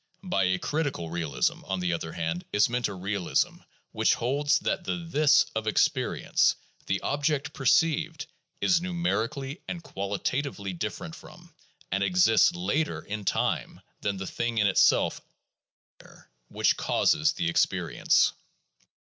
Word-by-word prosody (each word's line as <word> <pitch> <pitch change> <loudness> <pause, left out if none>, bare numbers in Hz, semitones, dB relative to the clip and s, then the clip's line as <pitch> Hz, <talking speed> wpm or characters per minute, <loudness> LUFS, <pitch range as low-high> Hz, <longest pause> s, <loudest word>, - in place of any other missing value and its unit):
By 140 - +1
a 90 0 +1
critical 140 - -2
realism, 75 -7 -1
on 95 -1 -2
the 90 -1 0
other 80 -1 -4
hand, 85 +1 -3
is 105 - +4
meant 120 -1 0
a - - -6
realism 95 0 -1 0.3
which - - +2
holds 140 +5 +1
that - - -2
the 175 - -2
"this" 155 -2 +4
of 110 0 -3
experience, 110 - +2 0.3
the - - 0
object 150 0 -1
perceived, 160 +2 +1 0.4
is 180 -2 +4
numer 175 -9 0
ically 140 +4 -7
and 170 -1 -5
qualitatively 100 +2 -3
different 85 - -5
from, - - -14 0.4
and 100 +1 +1
exists 175 - +4
later 160 -3 -1
in 105 0 -6
time - - -1 0.2
than, 100 -1 -1
the 95 - -5
thing 115 +4 -3
in 105 - +3
itself 95 - +3
"out - - -32 0.7
there" - - -18 0.2
which - - +1
causes 75 - +2
the - - -2
experience. 85 - +2
115 Hz, 140 wpm, -27 LUFS, 95-155 Hz, 0.7 s, is